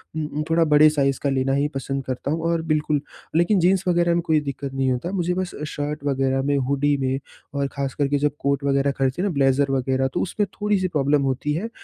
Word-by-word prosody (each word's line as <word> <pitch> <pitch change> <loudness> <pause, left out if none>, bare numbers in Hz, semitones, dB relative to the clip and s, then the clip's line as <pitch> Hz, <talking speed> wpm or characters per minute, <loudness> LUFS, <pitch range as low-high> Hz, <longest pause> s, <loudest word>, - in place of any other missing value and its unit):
उ - - -2
उम, 150 0 -3
थोड़ा 165 +1 +4
बड़े 150 +1 +7
साइज़ 140 -3 0
का 140 - +2
लेना 135 0 +1
ही 140 +1 +2
पसंद 135 0 -3
करता 130 +2 -3
हूँ 165 +1 -1
और 165 -1 0
बिल्कुल, 150 -1 +1 0.3
लेकिन 175 +4 +3
जीन्स 185 +2 +3
वग़ैरह 175 -1 +3
में 170 - +1
कोई 160 -3 +3
दिक्कत 140 -1 -5
नहीं 135 -1 +1
होता। 130 +8 -2
मुझे 180 -2 0
बस 185 0 -3
अ, - - -3
शर्ट 150 -1 -4
वग़ैरह 135 -1 +1
में, 145 +1 +1
हुडी 140 +2 +1
में, 130 0 0 0.3
और 140 -1 0
ख़ास 140 -1 -2
कर 145 - +1
के 145 +1 +1
जब 145 +1 +1
कोट 140 0 0
वग़ैरह 140 0 +2
खरीदते 135 +5 0
हैं 200 - +1
ना - - -3
ब्लेज़र 135 0 +2
वग़ैरह 130 0 +1
तो - - 0
उसमें 205 +3 -1 0.2
थोड़ी-सी 205 -3 +1
प्रॉब्लम 145 -3 +1
होती 140 +3 -2
है। 190 +9 -3
145 Hz, 240 wpm, -23 LUFS, 135-165 Hz, 0.3 s, बड़े